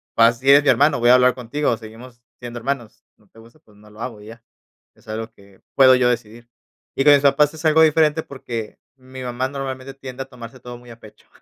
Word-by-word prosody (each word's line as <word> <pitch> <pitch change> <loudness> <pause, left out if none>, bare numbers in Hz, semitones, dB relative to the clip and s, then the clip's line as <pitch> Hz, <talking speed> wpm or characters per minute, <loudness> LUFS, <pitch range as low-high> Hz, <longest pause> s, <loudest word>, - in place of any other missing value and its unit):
Pero 115 - +5
así 120 +4 -1
es 145 +1 +7
mi 145 - +1
hermano, 145 +1 +3
voy 120 +1 +2
a - - +8
hablar 125 0 +3
contigo, 125 0 -2
seguimos 115 +2 -13 0.2
siendo 120 -1 -8
hermanos. 120 -2 -5
No 105 - -29
te 110 - -26
gusta, 115 +6 -18
pues 105 -9 -25
no 105 0 -19
lo 105 +1 -14
hago 115 -4 -7
y - - -14
ya. 115 +1 -13 0.5
Es 115 - -27
algo 110 +1 -6
que 100 -3 -22
puedo 130 -1 +6
yo 125 -1 +2
decidir. 120 0 -5 0.5
Y 135 - 0
con 145 0 +7
mis 140 - +4
papás 145 +1 +3
es 160 0 -11
algo 160 +1 +5
diferente 155 0 +2
porque, 120 -5 -8 0.2
mi 130 0 -12
mamá 125 +1 -3
normalmente 135 -1 -7
tiende 135 -1 -8
a - - -18
tomarse 125 -1 -12
todo 120 0 -10
muy 120 0 -17
a 115 - -14
pecho, 110 - -18
125 Hz, 235 wpm, -20 LUFS, 115-135 Hz, 0.5 s, a